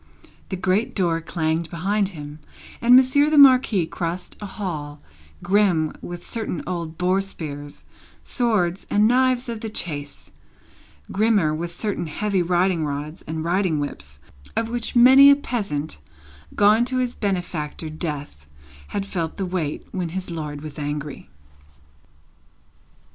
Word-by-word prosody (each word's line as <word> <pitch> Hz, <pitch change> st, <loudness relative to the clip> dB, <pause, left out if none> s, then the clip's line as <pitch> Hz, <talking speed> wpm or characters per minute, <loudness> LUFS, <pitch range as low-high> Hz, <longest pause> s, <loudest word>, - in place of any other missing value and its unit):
The 190 Hz, -, -2 dB
great 185 Hz, +4 st, 0 dB
door 170 Hz, -4 st, +1 dB
clanged 160 Hz, 0 st, -1 dB
behind 195 Hz, +4 st, 0 dB
him, 150 Hz, -4 st, -9 dB, 0.4 s
and 240 Hz, +1 st, +7 dB
Monsieur 265 Hz, +3 st, +5 dB
the 305 Hz, -, +2 dB
Marquis 255 Hz, -, +6 dB
crossed 170 Hz, +2 st, -4 dB
a 205 Hz, -, -5 dB
hall 155 Hz, -8 st, -5 dB, 0.4 s
grim 185 Hz, -6 st, +2 dB
with 175 Hz, 0 st, -8 dB
certain 220 Hz, -7 st, -3 dB
old 170 Hz, -3 st, -4 dB
boar 185 Hz, +2 st, +2 dB
spears, 145 Hz, -7 st, -8 dB, 0.4 s
swords, 205 Hz, -7 st, 0 dB
and 210 Hz, +1 st, +4 dB
knives 255 Hz, +1 st, +2 dB
of 230 Hz, -2 st, -5 dB
the 225 Hz, -, -4 dB
chase; 145 Hz, -8 st, -5 dB, 0.8 s
grimmer 205 Hz, -7 st, +2 dB
with 170 Hz, +2 st, -3 dB
certain 185 Hz, -1 st, -3 dB
heavy 195 Hz, +4 st, -1 dB
riding 175 Hz, -1 st, +1 dB
rods 150 Hz, +3 st, -4 dB
and 160 Hz, 0 st, -3 dB
riding 175 Hz, -2 st, +1 dB
whips, 75 Hz, -, -6 dB, 0.4 s
of 225 Hz, +1 st, 0 dB
which 240 Hz, 0 st, -3 dB
many 265 Hz, +3 st, +9 dB
a 280 Hz, -, +8 dB
peasant, 200 Hz, -, -3 dB, 0.6 s
gone 210 Hz, +3 st, +5 dB
to 255 Hz, +1 st, -1 dB
his 250 Hz, -1 st, 0 dB
benefactor 175 Hz, -6 st, -3 dB
Death, 145 Hz, -, -6 dB, 0.4 s
had 200 Hz, -1 st, -3 dB
felt 170 Hz, -5 st, -4 dB
the 195 Hz, -, -2 dB
weight 175 Hz, -5 st, -3 dB
when 180 Hz, -3 st, -3 dB
his 180 Hz, +1 st, -5 dB
lord 150 Hz, -3 st, -5 dB
was 155 Hz, 0 st, -8 dB
angry. 145 Hz, -, -5 dB
180 Hz, 135 wpm, -23 LUFS, 155-215 Hz, 0.8 s, many